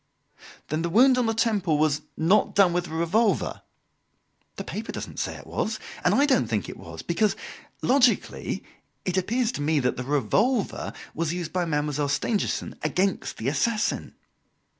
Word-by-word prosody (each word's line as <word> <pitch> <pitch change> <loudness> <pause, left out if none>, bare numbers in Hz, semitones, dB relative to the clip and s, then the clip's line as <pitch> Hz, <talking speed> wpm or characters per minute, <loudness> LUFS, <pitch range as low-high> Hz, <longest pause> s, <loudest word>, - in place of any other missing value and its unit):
"Then 155 +2 -1
the 170 - -1
wound 250 +7 +5
on 245 - +1
the 225 - 0
temple 205 -8 +1
was 150 -1 +2 0.2
not 185 +6 +3
done 195 -3 +5
with 175 0 0
the - - -9
revolver?" 170 +8 +1 0.9
"The - - -5
paper - - -5
doesn't - - -6
say - - -2
it - - -11
was, - - -2 0.2
and - - +4
I 285 - +5
don't 195 - +3
think 110 -5 -1
it - - -7
was; 80 0 -9
because 205 +5 +1 0.5
logically 250 -2 +2 0.4
it 185 - -1
appears 225 +6 +1
to - - -5
me 150 +1 +2
that 125 0 0
the 125 - -3
revolver 185 - +1 0.2
was 165 0 -1
used 175 -3 -4
by 180 -1 +1
Mademoiselle 150 -2 -1
Stangerson 205 +9 -1
against 195 +1 0
the 110 - -3
assassin. 220 +10 0
175 Hz, 165 wpm, -26 LUFS, 150-220 Hz, 0.9 s, wound